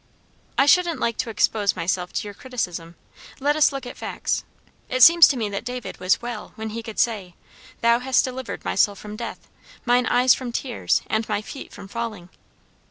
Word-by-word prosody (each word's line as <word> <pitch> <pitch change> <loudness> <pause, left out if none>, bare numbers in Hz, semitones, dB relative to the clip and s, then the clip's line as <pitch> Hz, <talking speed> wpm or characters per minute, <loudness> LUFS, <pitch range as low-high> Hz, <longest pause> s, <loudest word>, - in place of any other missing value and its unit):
"I 275 - +5
shouldn't 345 +2 +4
like 230 -2 -1
to 245 - -2
expose 210 -2 +1
myself 180 +1 -2
to - - -2
your 205 - -7
criticism. 180 -9 -5 0.4
Let 290 +2 +2
us 310 -1 +4
look 275 -2 -5
at 245 - -8
facts. - - -2 0.5
It 255 -1 +4
seems 335 +2 +9
to 275 - 0
me 220 -3 -1
that 200 +1 -4
David 245 0 -6
was 185 +5 +1
'well' 240 -3 -6
when 220 0 -5
he 230 +2 -4
could 225 -2 -9
say, 200 -7 0 0.5
'Thou 235 0 +4
hast 260 +1 +2
delivered 260 -1 -6
my - - -1
soul 200 +1 +3
from 210 +1 -9
death, 235 +1 -7 0.4
mine 245 0 +3
eyes 250 +1 +5
from 250 -2 -4
tears, 245 0 -1
and 220 0 -1
my 210 0 -1
feet 270 - -9
from 195 - -10
falling.' 215 -5 -5
235 Hz, 195 wpm, -23 LUFS, 210-255 Hz, 0.5 s, seems